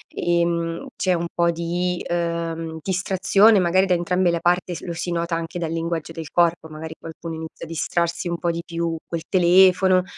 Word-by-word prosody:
ehm, 170 Hz, +4 st, 0 dB
c'è 185 Hz, -, +1 dB
un 170 Hz, -1 st, -1 dB
po' 170 Hz, 0 st, +2 dB
di, 175 Hz, +1 st, -2 dB
uhm, 165 Hz, -1 st, -2 dB
distrazione 195 Hz, +3 st, +3 dB
magari 185 Hz, +1 st, +3 dB
da 185 Hz, -, +3 dB
entrambe 180 Hz, +1 st, +1 dB
la 170 Hz, -, 0 dB
parte, 175 Hz, +1 st, +1 dB
s -, -, -7 dB
lo 170 Hz, -, -5 dB
si 170 Hz, +1 st, -4 dB
nota 170 Hz, 0 st, -1 dB
anche 165 Hz, +1 st, -4 dB
dal 165 Hz, -2 st, -3 dB
linguaggio 165 Hz, -1 st, -3 dB
del 160 Hz, -2 st, -7 dB
corpo, 170 Hz, -2 st, +2 dB
magari 160 Hz, +1 st, -8 dB
qualcuno 165 Hz, 0 st, -8 dB
inizia 160 Hz, +1 st, -8 dB
a -, -, -13 dB
distrarsi 170 Hz, +1 st, -1 dB
un 170 Hz, -, -2 dB
po' 175 Hz, -, 0 dB
di 170 Hz, 0 st, -4 dB
più 170 Hz, -1 st, -2 dB
col 170 Hz, -1 st, -3 dB
telefono, 185 Hz, 0 st, +5 dB
170 Hz, 190 wpm, -22 LUFS, 165-180 Hz, -, telefono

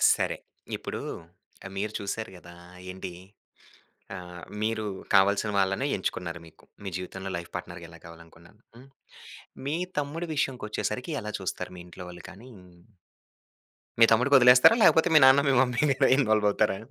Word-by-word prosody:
సరే, -, -, -2 dB, 0.4 s
ఇప్పుడూ -, -, -6 dB, 0.7 s
ఆహ్, 95 Hz, -, -8 dB
మీరు 105 Hz, +2 st, -3 dB
చూసారు 105 Hz, +2 st, -5 dB
గదా! 85 Hz, 0 st, -14 dB, 0.4 s
ఏంటి, 95 Hz, -1 st, -7 dB, 1.1 s
ఆహ్, 90 Hz, -1 st, -10 dB, 0.2 s
మీరు 110 Hz, 0 st, -1 dB, 0.3 s
కావల్సిన 100 Hz, +2 st, +3 dB
వాళ్ళనే 95 Hz, +8 st, +1 dB
ఎంచుకున్నారు 85 Hz, -2 st, -4 dB
మీకు, 80 Hz, -, -19 dB, 0.2 s
మీ 100 Hz, -, -5 dB
జీవితంలో 95 Hz, +1 st, -6 dB
లైఫ్ 85 Hz, 0 st, -7 dB
పార్ట్నర్‌గా 85 Hz, -1 st, -8 dB
ఎలా 85 Hz, -, -14 dB
కావాలనుకున్నా 85 Hz, 0 st, -15 dB, 0.3 s
హ్మ్. 130 Hz, +3 st, -15 dB, 0.8 s
మీ 145 Hz, +3 st, -1 dB, 0.2 s
తమ్ముడు 155 Hz, +4 st, -3 dB
విషయంకొచ్చేసరికి 125 Hz, +1 st, -3 dB
ఎలా 105 Hz, 0 st, -6 dB
చూస్తారు? 90 Hz, -1 st, -5 dB
మీ 85 Hz, -, -9 dB
ఇంట్లో 90 Hz, +1 st, -11 dB
వాళ్ళు 90 Hz, -, -12 dB
కానీ 110 Hz, +7 st, -14 dB, 1.5 s
మీ 115 Hz, -, +9 dB
తమ్ముడికొదిలేస్తారా? 125 Hz, -, +6 dB
లేకపోతే 160 Hz, 0 st, +5 dB
మీ 155 Hz, -, +9 dB
నాన్న, 130 Hz, +1 st, +7 dB
మీ -, -, +3 dB
మమ్మీ 125 Hz, -2 st, 0 dB
ఇందులో 135 Hz, -2 st, +2 dB
ఇన్‌వాల్వవుతారా? 105 Hz, -4 st, +2 dB
105 Hz, 135 wpm, -27 LUFS, 90-125 Hz, 1.5 s, మీ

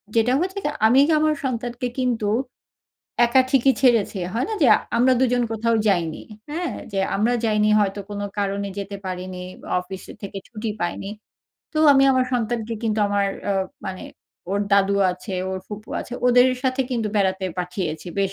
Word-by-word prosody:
যেটা 230 Hz, +2 st, +3 dB
হচ্ছে 380 Hz, +2 st, -3 dB
গে -, -, +2 dB, 0.2 s
আমি 250 Hz, +4 st, +5 dB, 0.2 s
আমার 310 Hz, 0 st, +2 dB
সন্তানকে 245 Hz, -1 st, -2 dB
কিন্তু 240 Hz, -4 st, 0 dB, 1.0 s
একা 235 Hz, +2 st, +4 dB
ঠিকই 270 Hz, 0 st, +4 dB
ছেড়েছি, 230 Hz, -5 st, +3 dB, 0.2 s
হয় 235 Hz, -, +1 dB
না 445 Hz, -, -2 dB
যে -, -, +6 dB, 0.3 s
আমরা 255 Hz, +2 st, +4 dB
দুজন 250 Hz, -1 st, +2 dB
কোথাও 230 Hz, +1 st, +1 dB
যাইনি। 170 Hz, -5 st, 0 dB, 0.3 s
হ্যাঁ? 340 Hz, +3 st, -2 dB, 0.2 s
যে 195 Hz, -, -1 dB, 0.2 s
আমরা 220 Hz, +4 st, +2 dB
যাইনি 210 Hz, -1 st, +2 dB
হয়তো 200 Hz, 0 st, 0 dB
কোন 205 Hz, 0 st, -4 dB, 0.2 s
কারণে 200 Hz, 0 st, -1 dB
যেতে 200 Hz, 0 st, -5 dB
পারিনি। 185 Hz, 0 st, -5 dB, 0.4 s
অফিস 185 Hz, +1 st, -8 dB, 0.2 s
থেকে 200 Hz, 0 st, -6 dB
ছুটি 220 Hz, -1 st, -4 dB
পাইনি। 175 Hz, +3 st, -3 dB, 0.6 s
তো 310 Hz, -, -2 dB
আমি 270 Hz, 0 st, +5 dB
আমার 255 Hz, -1 st, +3 dB
সন্তানকে 230 Hz, -1 st, -1 dB
কিন্তু 220 Hz, -1 st, 0 dB
আমার 200 Hz, 0 st, +1 dB, 0.2 s
অ -, -, +3 dB, 0.3 s
মানে 185 Hz, -1 st, -5 dB, 0.5 s
ওর 200 Hz, +1 st, 0 dB
দাদু 200 Hz, 0 st, +4 dB, 0.2 s
আছে 185 Hz, +2 st, -8 dB, 0.2 s
ওর 190 Hz, -, -3 dB
ফুপু 215 Hz, +1 st, -8 dB
আছে। -, -, -9 dB
ওদের 250 Hz, +1 st, +6 dB
সাথে 260 Hz, 0 st, 0 dB
কিন্তু 230 Hz, -4 st, -1 dB
বেড়াতে 190 Hz, -1 st, +1 dB
পাঠিয়েছি, 180 Hz, -3 st, -3 dB
বেশ 195 Hz, -1 st, 0 dB
215 Hz, 165 wpm, -23 LUFS, 195-250 Hz, 1.0 s, যে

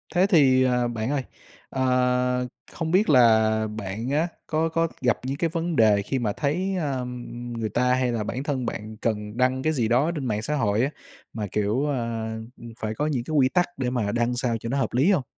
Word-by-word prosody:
Thế 180 Hz, +2 st, +5 dB
thì, 135 Hz, -9 st, +5 dB
ờ, 125 Hz, -1 st, +2 dB
bạn 115 Hz, 0 st, -3 dB
ơi, 140 Hz, -3 st, 0 dB, 0.5 s
ờ, 125 Hz, -1 st, +1 dB, 0.2 s
không 160 Hz, -1 st, -3 dB
biết 195 Hz, +5 st, +3 dB
là 115 Hz, -5 st, +6 dB, 0.3 s
bạn 110 Hz, +4 st, -4 dB
á 150 Hz, +4 st, +1 dB, 0.2 s
có 160 Hz, 0 st, +1 dB
có 165 Hz, +1 st, +1 dB
gặp 120 Hz, -4 st, +2 dB
những 135 Hz, +2 st, -2 dB
cái 165 Hz, +1 st, 0 dB
vấn 165 Hz, 0 st, -2 dB
đề 105 Hz, -4 st, +5 dB
khi 130 Hz, +6 st, -2 dB
mà 110 Hz, -4 st, -1 dB
thấy, 180 Hz, -, -1 dB
ơ, 135 Hz, -6 st, -2 dB, 0.5 s
người 110 Hz, -1 st, -2 dB
ta 125 Hz, +4 st, +2 dB
hay 125 Hz, -1 st, +1 dB
là 115 Hz, -2 st, -1 dB
bản 125 Hz, +5 st, -4 dB
thân 135 Hz, -4 st, -2 dB
bạn 110 Hz, -1 st, -5 dB
cần 105 Hz, -1 st, -3 dB
đăng 130 Hz, +1 st, +1 dB
cái 155 Hz, -, +1 dB
gì 120 Hz, -7 st, +1 dB
đó 130 Hz, +8 st, +2 dB
trên 145 Hz, -4 st, -3 dB
mạng 105 Hz, -3 st, -1 dB
xã 150 Hz, +7 st, -2 dB
hội 110 Hz, -5 st, +1 dB
á, 135 Hz, -, +1 dB, 0.4 s
mà, 105 Hz, -2 st, -3 dB
kiểu, 105 Hz, +7 st, 0 dB
ơ, 115 Hz, -5 st, -2 dB, 0.5 s
phải 110 Hz, 0 st, -2 dB
có 150 Hz, -, -1 dB
những 135 Hz, -6 st, -1 dB
cái 155 Hz, -, -7 dB
quy 130 Hz, -2 st, +4 dB
tắc 180 Hz, +2 st, +2 dB
để 130 Hz, -2 st, -1 dB
mà 120 Hz, -5 st, -1 dB
đăng 120 Hz, +1 st, 0 dB
sao 120 Hz, -1 st, 0 dB
cho 115 Hz, -, -5 dB
nó 135 Hz, -, 0 dB
hợp 135 Hz, -, -1 dB
lý 135 Hz, +11 st, +4 dB
hông? 170 Hz, -9 st, +2 dB
125 Hz, 220 wpm, -25 LUFS, 115-145 Hz, 0.5 s, là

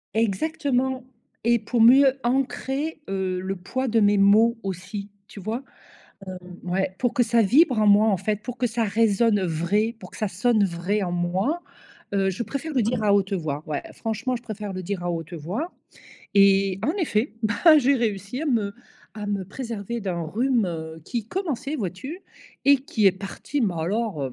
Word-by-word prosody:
Exactement! 260 Hz, +3 st, 0 dB, 0.4 s
Et 235 Hz, 0 st, +3 dB
pour 225 Hz, +2 st, 0 dB
mieux 265 Hz, +3 st, +7 dB
ancrer, 270 Hz, +4 st, -1 dB
heu, 190 Hz, -1 st, -1 dB
le 190 Hz, +1 st, -3 dB
poids 255 Hz, +9 st, -3 dB
de 225 Hz, 0 st, +2 dB
mes 205 Hz, -1 st, +4 dB
mots 220 Hz, +4 st, +5 dB
aussi, 195 Hz, +2 st, -5 dB, 0.2 s
tu 205 Hz, -, -11 dB
vois? 225 Hz, +7 st, -4 dB, 0.7 s
Hem, 185 Hz, -, -6 dB, 0.2 s
ouais, 190 Hz, +1 st, -1 dB
pour 245 Hz, -2 st, +1 dB
que 245 Hz, -, +3 dB
ça 230 Hz, 0 st, +3 dB
vibre 255 Hz, -, +4 dB
en 215 Hz, -, +3 dB
moi, 205 Hz, +2 st, +6 dB
en 200 Hz, -, +3 dB
fait, 210 Hz, +3 st, -2 dB
pour 250 Hz, -1 st, -6 dB
que 245 Hz, +1 st, +1 dB
ça 230 Hz, 0 st, 0 dB
résonne, 215 Hz, 0 st, +2 dB
heu, 185 Hz, -, 0 dB
vrai, 205 Hz, +8 st, 0 dB
pour -, -, -11 dB
que -, -, -11 dB
ça 215 Hz, -3 st, -1 dB
sonne 215 Hz, +3 st, +2 dB
vrai, 190 Hz, +3 st, -1 dB
en 180 Hz, -, -2 dB
moi, 185 Hz, -, 0 dB, 0.5 s
heu, 195 Hz, -1 st, +2 dB
je 195 Hz, +6 st, -3 dB
préfère 280 Hz, +7 st, -5 dB
le 255 Hz, -5 st, +2 dB
dire 225 Hz, +1 st, 0 dB
à 205 Hz, -1 st, +3 dB
haute 200 Hz, 0 st, +2 dB
voix. 155 Hz, -5 st, -2 dB
Ouais, 150 Hz, -2 st, -3 dB
franchement, 240 Hz, +3 st, -2 dB
je 235 Hz, -, -10 dB
préfère 210 Hz, -3 st, -5 dB
le 185 Hz, 0 st, -5 dB
dire 190 Hz, -1 st, -3 dB
à 175 Hz, -, -1 dB
haute 165 Hz, 0 st, -5 dB
voix 195 Hz, -, -4 dB, 0.6 s
et 195 Hz, -1 st, +4 dB
en 295 Hz, -, +2 dB
effet, 280 Hz, -, 0 dB
bah, 305 Hz, +9 st, +5 dB
j'ai 275 Hz, +1 st, +3 dB
réussi 220 Hz, -, -2 dB
à -, -, -2 dB
me 215 Hz, -7 st, 0 dB, 0.4 s
à 210 Hz, -, -5 dB
me 200 Hz, -2 st, -2 dB
préserver 230 Hz, 0 st, -5 dB
d'un 180 Hz, -3 st, -2 dB
rhume, 230 Hz, -, +1 dB
heu, 160 Hz, -1 st, -6 dB
qui 230 Hz, +3 st, -4 dB
commençait, 310 Hz, -5 st, -3 dB
vois-tu? 255 Hz, -, -5 dB, 0.4 s
Et 280 Hz, 0 st, +6 dB
qui 225 Hz, -6 st, +1 dB
est -, -, +6 dB
parti, 195 Hz, +9 st, -5 dB
mais 200 Hz, -7 st, +1 dB
alors, 170 Hz, -, -1 dB
215 Hz, 190 wpm, -24 LUFS, 190-245 Hz, 0.7 s, mieux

